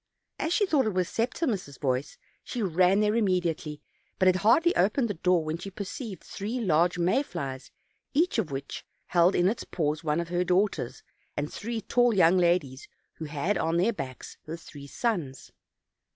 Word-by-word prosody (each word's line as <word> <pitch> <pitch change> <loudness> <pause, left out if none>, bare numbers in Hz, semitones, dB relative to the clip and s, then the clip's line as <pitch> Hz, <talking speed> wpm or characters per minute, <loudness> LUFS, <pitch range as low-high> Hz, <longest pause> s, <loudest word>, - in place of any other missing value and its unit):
As 320 - -1
she 410 +3 +3
thought 295 - +2
it 210 - -2
was 180 -2 +1
Septimus' 225 - -2
voice, 130 -1 -2 0.3
she 240 - -4
ran 185 +2 +3
there 210 0 +2
immediately; 175 -8 0 0.3
but 185 - +2
had 185 0 +5
hardly 270 - +4
opened 215 +7 +2
the 205 - -2
door 180 -1 +2
when 155 +1 -3
she 195 - -6
perceived 200 - -7
three 220 +6 -4
large 175 -4 +2
may 180 +10 +2
flies, 135 - -6 0.5
each 325 -4 +2
of 185 -8 -1
which 135 0 -6 0.2
held 175 +2 +3
in 175 - +3
its 220 +4 -1
paws 155 -1 -2
one 155 0 0
of 170 -1 -3
her 175 +1 +1
daughters; 180 - 0 0.3
and 145 +1 -3
three 230 +1 -4
tall 245 +1 +2
young 180 0 +5
ladies 170 -7 +1 0.3
who 160 - -5
had 155 +7 -1
on 165 +1 +1
their 205 +7 +2
backs 130 - -7
her 160 +2 -5
three 145 -3 -11
sons. 165 - -3
180 Hz, 180 wpm, -28 LUFS, 155-215 Hz, 0.5 s, had